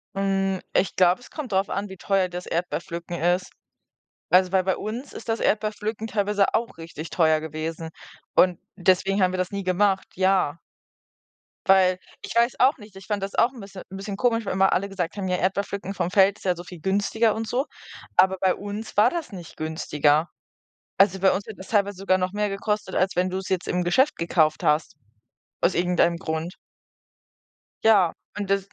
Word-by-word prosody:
Hm, 195 -1 0
ich 190 - +1
glaube, 180 +5 +4
es - - -15
kommt 280 -8 -6
darauf 195 +1 +1
an, 200 +1 -3
wie 190 - -9
teuer 190 -1 +1
das 180 0 -6
Erdbeerpflücken 170 0 -4
ist. 175 +2 +1 0.8
Also, 185 0 +5
weil 185 -1 +3
bei 190 - +1
uns 235 +6 -6
ist - - -10
das 225 - 0
Erdbeerpflücken 215 +1 -1
teilweise 205 -1 +1
auch 230 -5 -1
richtig 165 -1 -8
teuer 160 -2 +3
gewesen 160 +1 -5 0.4
und 180 -2 +4 0.2
deswegen 190 +1 +2
haben 185 0 +3
wir 185 - -3
das 185 -1 -1
nie 200 0 -3
gemacht, 190 +1 +2
ja. 185 -4 +2 1.1
Weil, 185 -1 +5 0.2
ich - - -7
weiß 235 +1 +2
auch 265 +3 +4
nicht, 210 -3 -15
ich 195 - -12
fand 205 -2 -2
das 200 - -5
auch 240 - +4
'n 245 - -11
bisschen 195 -1 -10
'n 190 - -9
bisschen 200 0 -5
komisch, 230 -3 +1
weil - - -2
immer 195 0 +3
alle 200 +2 0
gesagt 185 -1 -3
haben: 195 -2 -3
„Ja, 180 - +1
Erdbeerpflücken 195 +1 -2
vom 180 -2 -2
Feld 195 0 +4
ist - - -17
ja 180 -1 +2
so 175 - -7
viel 175 -4 -11
günstiger 205 +3 +1
und 225 0 -4
so.“ 260 +4 -1 0.5
Aber 190 +1 +5
bei 185 -1 +3
uns 205 +2 -7
war 210 - +6
das 330 -8 -5
nicht 175 -4 -10
günstiger. 155 0 +1 0.7
Also 195 -1 +4
bei 190 0 +4
uns 200 - -2
hätte 220 - -9
das 190 - -11
teilweise 200 -3 +1
sogar 190 -1 +2
noch 185 +1 -2
mehr 210 0 0
gekostet, 210 0 -2
als 190 +1 +1
wenn 185 +1 +1
du 185 +1 -3
's 190 - -7
jetzt 185 -2 -1
im 180 0 0
Geschäft 265 +12 +3
gekauft 160 -2 +2
hast, 150 0 +1 0.7
aus 175 - +3
irgendeinem 175 -1 +2
Grund. 160 +3 -4 1.3
Ja, 200 -6 +5 0.2
und 200 -1 -4
das 195 0 -1
190 Hz, 195 wpm, -24 LUFS, 180-205 Hz, 1.3 s, war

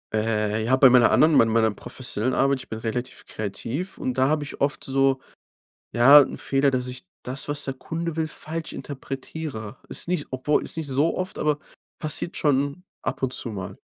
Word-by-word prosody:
Äh, 110 0 0
ja, 125 +4 +3
bei 130 -1 +7
meiner 120 -3 +6
anderen, 155 +1 +5
mei 115 - +6
meiner 110 0 +3
professionellen 120 +2 -3
Arbeit, 135 -1 +2
ich - - -11
bin 110 - -4
relativ 120 +3 -4
kreativ 115 - -5
und 130 - -2
da 130 +2 +2
habe 155 -1 +1
ich 145 - -9
oft 140 0 0
so, 135 0 +2 0.7
ja, 135 +5 +9
'n 140 - 0
Fehler, 140 +1 +2
dass 125 -1 -1
ich 125 -4 -8 0.2
das, 130 +3 -4
was 145 0 -1
der 135 - -3
Kunde 165 +4 -4
will, 160 -1 -1
falsch 160 +1 -5
interpretiere. 135 -4 -6
Ist - - -3
nicht 175 -4 0
s - - -36
obwohl 130 +3 +1
ist - - -7
nicht 160 -2 -3
so 140 +4 +1
oft, 185 0 -3
aber 150 -1 +1 0.4
passiert 155 +3 -4
schon 145 +4 0 0.2
ab - - -2
und 130 - -2
zu 120 - -4
mal. 95 -3 -6
135 Hz, 200 wpm, -24 LUFS, 120-150 Hz, 0.7 s, ja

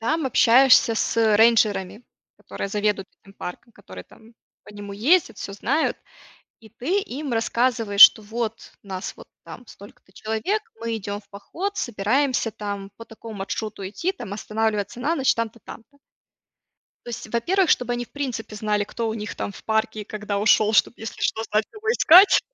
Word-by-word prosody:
Там 305 +6 -1
общаешься 250 -1 +5
с, 225 - -1
э, 220 -2 +4
рейнджерами, 215 -2 +2 0.3
которые 200 - -7
заведуют 205 -1 -1
этим 195 0 -18
парком, 230 +7 -9
которые 90 -1 -12
там 225 +1 -20 0.3
по - - -13
нему 205 -1 -9
ездят, 275 - +2
всё 200 - -6
знают. 275 +10 -1 0.6
И 220 - -17
ты 275 - -1
им 280 -6 -5
рассказываешь, 225 -2 0
что 220 - +10
вот 225 +1 -5
нас 190 -1 -6
вот - - -14 0.2
там 245 - -11
столько-то 200 -1 -16
человек, 220 - -2 0.2
мы 230 0 -2
идем 205 0 -5
в - - -32
поход, 360 - -6
собираемся 240 +3 0
там 200 -2 -6
по 230 - -10
такому 225 -1 -11
маршруту 200 0 -5
идти, 340 - -2
там 225 - -8
останавливаться 215 0 -2
на 310 +6 0
ночь, 270 -3 +2
там-то, 230 0 -4
там-то. 280 +5 -13 1.1
То - - -8
есть, 225 -2 -7
во-первых, 350 +10 +1
чтобы 245 -1 +2
они 240 0 -3
в - - -27
принципе 250 -7 -5
знали, 210 -1 -1
кто 230 +2 -4
у 220 - -3
них 210 -1 -6
там - - -4
в - - -14
парке 220 -1 -1
и - - -12
когда 210 -1 -4
ушел, 215 +1 +3
чтоб, 220 - +3
если 225 - -8
что, 220 - -1
знать, 215 +1 +2
кого 435 0 -8
искать. 380 -3 +7
225 Hz, 175 wpm, -23 LUFS, 205-245 Hz, 1.1 s, что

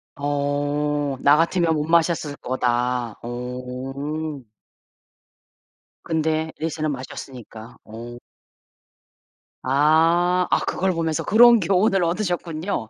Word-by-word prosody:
어 145 0 -1
나 145 +1 +6
같으면 170 0 +2
못 150 - -1
마셨을 165 -3 +1
거다. 125 -2 -1
어. 130 +5 -5 1.6
근데 160 0 -1
앨리스는 155 -1 -2
마셨으니까. 125 -3 -9
오. 115 +2 -9 1.5
아. 165 +6 +3
아 - - +3
그걸 190 0 -1
보면서 165 -2 -1
그런 235 +2 +6
교훈을 190 +1 +2
얻으셨군요. 175 - -2
150 Hz, 190 characters per minute, -22 LUFS, 130-165 Hz, 1.6 s, 나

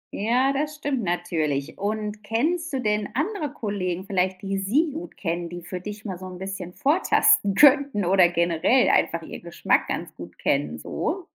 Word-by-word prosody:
Ja, 250 +6 +2
das 300 +2 -2
stimmt 285 -4 -2
natürlich. 160 -5 -2
Und 210 +1 -3
kennst 315 +11 -1
du 270 - -1
denn 210 -3 0
andere 310 - -2
Kollegen 190 -7 -3
vielleicht, 190 -1 -1
die 195 0 -2
sie 275 - +1
gut 320 +5 -8
kennen, 170 -1 -3
die 175 0 -8
für 180 +1 -6
dich 210 +2 -8
mal 185 -4 -5
so 185 - -8
'n 180 -1 -8
bisschen 190 -2 -6
vortasten 290 - +3
könnten 280 -6 +5
oder 185 -1 +5
generell 170 +8 +2
einfach - - +2
ihren - - -8
Geschmack - - 0
ganz - - -4
gut - - -11
kennen, - - 0
so? 375 -2 -3
205 Hz, 175 wpm, -24 LUFS, 180-275 Hz, -, könnten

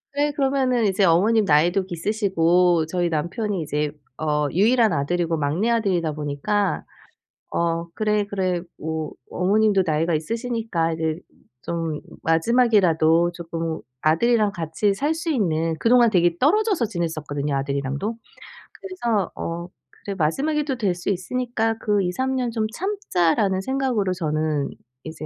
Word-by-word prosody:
네 290 +1 +1
그러면은 265 -4 +1
이제 195 0 +2
어머님 205 +6 +4
나이도 175 +5 +3
있으시고 175 -3 +2
저희 175 0 0
남편이 175 +5 -2
이제 150 -1 -2 0.3
어 150 -1 0
유일한 225 +4 +4
아들이고 165 +3 0
막내아들이다 175 +1 0
보니까 150 +8 -1 0.7
'어 170 0 -1
그래, 210 -1 0
그래 185 -3 -1 0.2
뭐 160 -1 -4 0.2
어머님도 200 +1 +2
나이가 160 +2 +1
있으시니까 225 -1 -2
이제 160 0 -2 0.4
좀 165 -3 -3 0.2
마지막이라도 170 -3 +3
쪼끔 165 -1 -4 0.2
아들이랑 210 +6 +3
같이 170 +3 -1
살 295 +9 0
수 330 0 -3
있는' 165 - 0
그동안 235 -1 +5
되게 175 -3 +2
떨어져서 385 - +2
지냈었거든요 155 -6 -3
아들이랑도. 140 +9 -2 0.6
그래서 235 - -2
'어 170 +1 -4 0.4
그래 200 -1 -3
마지막이 290 - 0
또 265 -4 -2
될 195 -6 0
수 175 - -4
있으니까 225 +3 -1
그 205 -1 +1
2-3 260 +9 -1
년 250 -2 0
좀 220 -1 -1
참자.'라는 200 - 0
생각으로 250 -6 0
저는 155 -4 -1 0.3
이제 160 -1 -7
180 Hz, 315 characters per minute, -23 LUFS, 160-225 Hz, 0.7 s, 그동안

